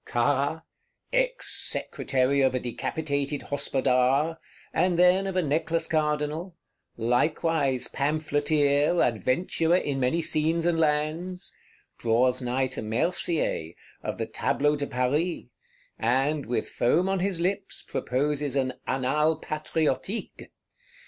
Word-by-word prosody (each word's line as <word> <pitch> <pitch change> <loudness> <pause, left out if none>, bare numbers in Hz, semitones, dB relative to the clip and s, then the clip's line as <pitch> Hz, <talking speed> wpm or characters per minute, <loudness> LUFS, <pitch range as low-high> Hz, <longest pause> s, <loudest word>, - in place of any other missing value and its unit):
Carra, 145 +6 0 0.5
"Ex - - 0
secretary 135 +1 0
of 130 -1 +3
a - - +1
decapitated 140 +3 -3
Hospodar," 135 +3 +1 0.3
and 180 +1 +2
then 180 +2 +4
of 190 - -3
a 185 - +2
Necklace 160 +3 0
Cardinal; 155 +3 -1 0.4
likewise 135 +3 +1
pamphleteer, 145 +1 +1
Adventurer 145 - +1
in 145 -6 0
many 130 +6 +1
scenes 165 +1 0
and 170 -1 +2
lands,—draws 150 -6 -1
nigh 125 +2 0
to 130 - -5
Mercier, 115 - 0 0.3
of - - -4
the - - -2
Tableau 145 +1 +1
de 145 -1 -3
Paris; 140 +7 0 0.6
and, 135 +5 +1
with 120 - -1
foam 165 +10 +2
on 195 0 0
his 185 -1 -1
lips, 195 +3 -1
proposes 145 +1 -1
an 130 -2 0
Annales 150 +5 +1
Patriotiques. 155 - -2
150 Hz, 110 wpm, -27 LUFS, 130-165 Hz, 0.6 s, then